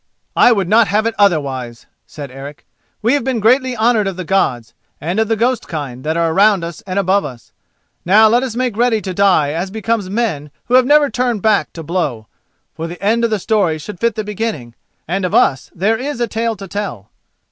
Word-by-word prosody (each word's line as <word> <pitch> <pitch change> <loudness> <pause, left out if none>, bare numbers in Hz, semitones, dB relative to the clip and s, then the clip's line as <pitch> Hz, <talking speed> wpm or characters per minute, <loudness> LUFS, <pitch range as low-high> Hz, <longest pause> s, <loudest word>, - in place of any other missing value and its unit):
"I - - +6
would 200 -6 +1
not 220 +3 +4
have 215 +2 +1
it 230 - 0
otherwise," 135 - 0 0.2
said 145 -3 -9
Eric. 140 +2 -10 0.4
"We 235 +4 +3
have 285 - +1
been 255 -2 -1
greatly 250 +3 +2
honoured 220 -2 +2
of 195 - -3
the 185 - -4
Gods, 125 - 0 0.3
and 175 +7 -2
of 220 - +2
the 225 - +1
ghost 240 +3 0
kind 135 -5 -6
that 160 +2 -1
are 165 -1 +1
around 200 0 +3
us 170 +5 -7
and 185 +1 -3
above 200 +1 +2
us. 120 -5 -10 0.5
Now 210 +5 +6
let 235 +3 +3
us 255 -4 -4
make 250 -3 -1
ready 235 -1 +2
to 190 -3 -5
die 180 -7 +3
as 175 +4 -3
becomes 220 -1 -2
men 195 -9 -2 0.2
who 245 - -4
have 255 0 +5
never 290 -1 +4
turned 245 -5 -1
back 215 -2 +2
to 165 - -8
blow, 150 -9 -2 0.5
for 165 - -5
the 175 +1 -9
end 225 +4 +1
of 230 - +2
the 215 - 0
story 195 -5 0
should 175 +4 -9
fit 235 -2 0
the 215 - -3
beginning, 210 - -4 0.3
and 190 +4 -2
of 180 - -1
us 135 -3 +2
there 210 +6 +1
is 275 -1 -4
a 240 - +1
tale 230 0 -2
to 195 -1 -9
tell." 175 - -6
200 Hz, 220 wpm, -17 LUFS, 165-230 Hz, 0.5 s, I